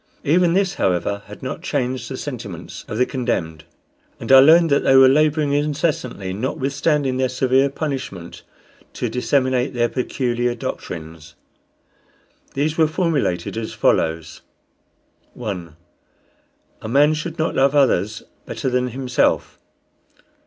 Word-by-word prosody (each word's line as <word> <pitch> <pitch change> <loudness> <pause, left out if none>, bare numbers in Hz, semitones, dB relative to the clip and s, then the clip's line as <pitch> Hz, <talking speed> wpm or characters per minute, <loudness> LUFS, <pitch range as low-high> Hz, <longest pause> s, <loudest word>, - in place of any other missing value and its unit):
Even 170 +3 +3
this, 195 0 +1
however, 95 - -1
had 105 +4 -12
not 135 +5 -5
changed 130 -7 -2
the 130 - -5
sentiments 115 - -7
of 110 - -5
the 125 - +3
condemned, 85 - -3 0.5
and - - -4
I 135 - +10
learned 160 +3 +6
that 140 - +3
they 135 - +4
were 135 0 +8
laboring 150 +1 +2
incessantly, 145 - -1
notwithstanding 135 - -1
their 130 -1 +1
severe 130 +2 +2
punishment, 135 - -5 0.5
to - - -3
disseminate 130 +1 0
their 120 -1 +1
peculiar 120 -2 -1
doctrines. 80 -7 -7 1.2
These 150 +3 -1
were 160 - +5
formulated 155 - -1
as 115 -1 -4
follows: 80 0 0 0.9
1. 90 -9 -6 1.1
A - - -6
man 145 +6 +4
should 155 +2 -5
not 160 - -1
love 140 +2 +2
others 110 -7 +2 0.2
better 130 - -3
than 125 0 +1
himself. 125 0 -1
130 Hz, 125 wpm, -20 LUFS, 110-145 Hz, 1.2 s, I